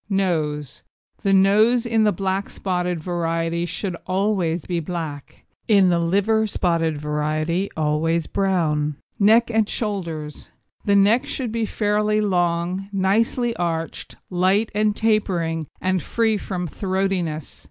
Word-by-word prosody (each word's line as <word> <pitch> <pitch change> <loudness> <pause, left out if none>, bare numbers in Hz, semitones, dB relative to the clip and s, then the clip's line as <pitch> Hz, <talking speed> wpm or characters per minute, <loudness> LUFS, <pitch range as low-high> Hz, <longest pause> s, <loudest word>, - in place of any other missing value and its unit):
NOSE 155 -8 -1 0.4
The 195 - +1
nose 215 +5 +4
in 225 -2 +2
the 210 - +4
black 195 +1 -2
spotted 180 -2 -2
variety 165 0 -1
should 185 0 -3
always 185 -4 0
be 175 -2 -1
black, 160 -4 -6 0.2
in 200 -4 +5
the 170 -1 +2
liver 205 +6 +2
spotted 165 -5 0
variety 155 +5 -1
always 160 +2 +1
brown. 155 -7 0 0.2
NECK 225 +3 +5
AND 220 -2 +2
SHOULDERS 170 -9 -4 0.4
The 200 - +3
neck 205 +5 +4
should 250 -5 -3
be 225 -1 -1
fairly 210 0 +1
long, 180 -1 0
nicely 225 +5 +1
arched, 165 -2 -3 0.2
light 190 +5 +2
and 210 0 +1
tapering, 175 -8 0
and 185 0 +1
entirely - - -3
free 225 -2 +3
from 185 -3 -4
throatiness. 185 -4 -2
185 Hz, 130 wpm, -22 LUFS, 165-210 Hz, 0.4 s, in